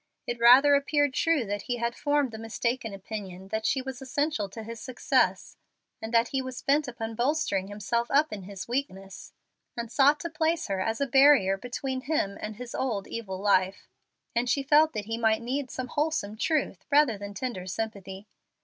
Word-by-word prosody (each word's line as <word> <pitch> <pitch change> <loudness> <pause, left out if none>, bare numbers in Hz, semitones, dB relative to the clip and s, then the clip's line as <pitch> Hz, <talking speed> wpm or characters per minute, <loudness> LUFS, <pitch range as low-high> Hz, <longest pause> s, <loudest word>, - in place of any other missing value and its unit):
It 240 0 -4
rather 255 +5 +7
appeared 285 0 +2
true 320 -3 +2
that 205 0 -3
he 245 - 0
had 235 0 -1
formed 290 -3 +1
the 220 - -8
mistaken 225 +1 -2
opinion 195 -2 -7
that 220 +1 -1
she 265 -1 0
was 265 -1 -7
essential 265 -5 -1
to 220 +3 -8
his 230 +1 -8
success, 255 -2 0 0.4
and 220 - -5
that 230 0 +3
he 270 - -1
was 260 -1 -7
bent 285 +1 +2
upon 225 -2 -5
bolstering 240 -6 0
himself 210 +4 -2
up 290 -2 +3
in 205 - -5
his 190 0 -8
weakness, 195 -7 -5 0.5
and 235 -1 -4
sought 285 +4 +4
to 340 - -4
place 320 +1 0
her 195 -1 -1
as 225 +6 -2
a - - +3
barrier 270 -7 +5
between 255 +5 -4
him 265 -9 -1
and 215 0 -5
his 245 +1 -8
old 225 -7 -2
evil 195 -5 -5
life; 195 -1 +1 0.5
and 240 +1 +1
she 275 +3 +1
felt 305 +3 +4
that 210 -2 -4
he 225 +1 -3
might 220 0 +2
need 260 +2 -2
some 255 -1 -5
wholesome 295 -9 -1
truth 270 - -1
rather 285 -5 +4
than 200 0 -8
tender 195 -5 -4
sympathy. 200 -1 -5
235 Hz, 190 wpm, -27 LUFS, 205-275 Hz, 0.5 s, rather